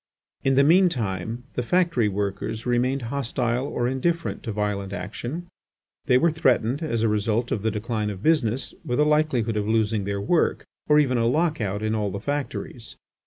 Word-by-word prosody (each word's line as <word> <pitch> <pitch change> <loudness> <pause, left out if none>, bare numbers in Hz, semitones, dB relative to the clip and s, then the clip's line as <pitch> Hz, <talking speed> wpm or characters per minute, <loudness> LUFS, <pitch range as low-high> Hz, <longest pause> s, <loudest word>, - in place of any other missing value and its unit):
In 135 0 +3
the 140 - +6
mean 180 +5 +5
time 110 - -3
the - - -1
factory 165 - +2
workers 100 +2 -3
remained 125 +2 +1
hostile 125 -1 -1
or 120 -3 -1
indifferent 165 +6 -1
to 115 - -4
violent 100 -2 -2
action. 115 - -5 0.6
They 125 - +5
were 165 +5 +3
threatened, 130 -3 +1
as 115 -8 -1
a - - +4
result 110 +3 0
of 105 - 0
the 110 - +1
decline 110 0 -2
of 100 0 -7
business, 135 -6 +1
with 120 +2 -1
a 150 - +5
likelihood 150 -8 +1
of 105 0 -1
losing 110 -2 +1
their 100 0 -2
work, 135 - +1 0.2
or 150 - +5
even 130 -5 +3
a 115 - +2
lock 155 +2 +1
out 100 0 -2
in 110 0 0
all 105 -2 0
the 100 +1 -5
factories. 135 -2 -4
120 Hz, 185 wpm, -24 LUFS, 105-140 Hz, 0.6 s, the